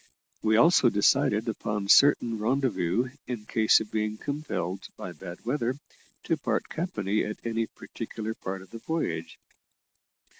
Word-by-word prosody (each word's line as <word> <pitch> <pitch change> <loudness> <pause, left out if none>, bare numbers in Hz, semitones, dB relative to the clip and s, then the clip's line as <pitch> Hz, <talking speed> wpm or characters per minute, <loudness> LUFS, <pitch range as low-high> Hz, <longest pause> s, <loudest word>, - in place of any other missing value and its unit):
We 110 0 +3
also 145 -2 +6
decided 105 +1 +3
upon 105 -2 -2
certain 120 -2 +5
rendezvous 115 -3 +1 0.2
in 120 -4 -5
case 110 0 +4
of 105 - -7
being 110 0 -1
compelled, 100 - -4
by - - -6
bad 90 +4 -10
weather, 125 0 0 0.5
to - - 0
part - - -1
company 110 - -1
at 105 - -4
any 115 -1 -1
particular 110 0 -6
part 95 -3 -6
of 95 - -18
the 115 - -8
voyage. 100 - -3
110 Hz, 140 wpm, -28 LUFS, 100-125 Hz, 0.5 s, also